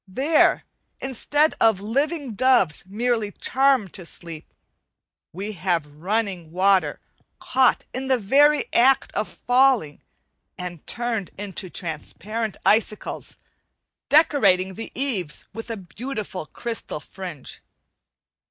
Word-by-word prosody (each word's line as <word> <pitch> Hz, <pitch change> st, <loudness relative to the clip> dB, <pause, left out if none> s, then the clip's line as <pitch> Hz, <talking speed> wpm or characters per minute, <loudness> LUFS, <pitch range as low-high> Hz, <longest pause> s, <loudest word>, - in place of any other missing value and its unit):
There, 275 Hz, -, +3 dB, 0.4 s
instead 290 Hz, +4 st, +1 dB
of 220 Hz, -4 st, +5 dB
living 275 Hz, -, -1 dB
doves 210 Hz, -, +2 dB
merely 220 Hz, +1 st, -1 dB
charmed 265 Hz, -7 st, +2 dB
to 185 Hz, -, -7 dB
sleep, 165 Hz, -3 st, -7 dB, 0.8 s
we 200 Hz, +5 st, -5 dB
have 170 Hz, -7 st, -2 dB
running 195 Hz, -4 st, -1 dB
water 185 Hz, -3 st, +2 dB, 0.4 s
caught 255 Hz, 0 st, +2 dB
in 265 Hz, +1 st, -3 dB
the 260 Hz, -1 st, +3 dB
very 285 Hz, +8 st, +4 dB
act 265 Hz, +3 st, +4 dB
of -, -, -1 dB
falling 245 Hz, -, +2 dB, 0.6 s
and 180 Hz, -3 st, -7 dB
turned 235 Hz, -5 st, -2 dB
into 195 Hz, -1 st, -5 dB
transparent 195 Hz, +7 st, -4 dB
icicles, 215 Hz, 0 st, 0 dB, 0.7 s
decorating 200 Hz, -, +4 dB
the 225 Hz, +4 st, -7 dB
eaves 215 Hz, -, -2 dB
with 225 Hz, +3 st, -7 dB
a 225 Hz, -, -3 dB
beautiful 200 Hz, -, -6 dB
crystal 230 Hz, -6 st, -4 dB
fringe. 175 Hz, -4 st, -8 dB
215 Hz, 105 wpm, -23 LUFS, 185-255 Hz, 0.8 s, of